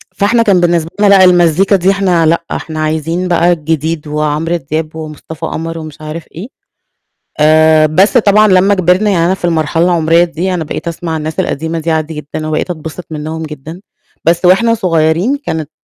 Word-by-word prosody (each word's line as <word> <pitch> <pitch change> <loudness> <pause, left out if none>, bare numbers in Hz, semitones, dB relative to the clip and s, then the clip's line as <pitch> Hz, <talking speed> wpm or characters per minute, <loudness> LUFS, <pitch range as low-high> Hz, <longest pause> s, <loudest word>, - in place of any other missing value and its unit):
فإحنا 230 +3 +2
كان 200 -5 +3
بالنسبة 170 -2 +1
لنا 205 - +4
لأ، 195 -1 +6
المزيكا 180 +2 +3
دي 190 +1 +2
إحنا 185 -4 +1
لأ، 165 +2 +1
إحنا 155 -1 -5
عايزين 160 +3 -2
بقى 175 0 +2
الجديد 160 -1 -2
وعمرو 150 +2 -1
دياب 155 +1 -4
ومصطفى 160 +1 -8
قمر 165 +1 -5
ومش 155 -1 -10
عارف 155 +1 -7
إيه، 185 +8 -7 0.9
آآ 155 0 +4
بس 190 - +3
طبعًا، 215 0 +4
لمّا 190 +1 +4
كبرنا 185 +3 +2
يعني، 170 -4 +1
أنا 185 - +1
في 185 - -13
المرحلة 165 0 0
العمرية 170 -1 +3
دي، 175 +2 -3
أنا 170 -3 -3
بقيت 155 +2 -5
أسمع 165 -1 -4
الناس 155 0 -4
القديمة 160 +3 -3
دي 165 +1 -3
عادي 160 0 -2
جدًا، 150 +1 -6
وبقيت 155 +3 -2
أتبسط 160 +1 -7
منهُم 155 +1 -5
جدًا، 155 +2 -9 0.4
بس 170 +2 +1
وإحنا 195 +6 +4
صغيرين 175 - +1
كانت 160 -2 -3
165 Hz, 180 wpm, -13 LUFS, 155-180 Hz, 0.9 s, لأ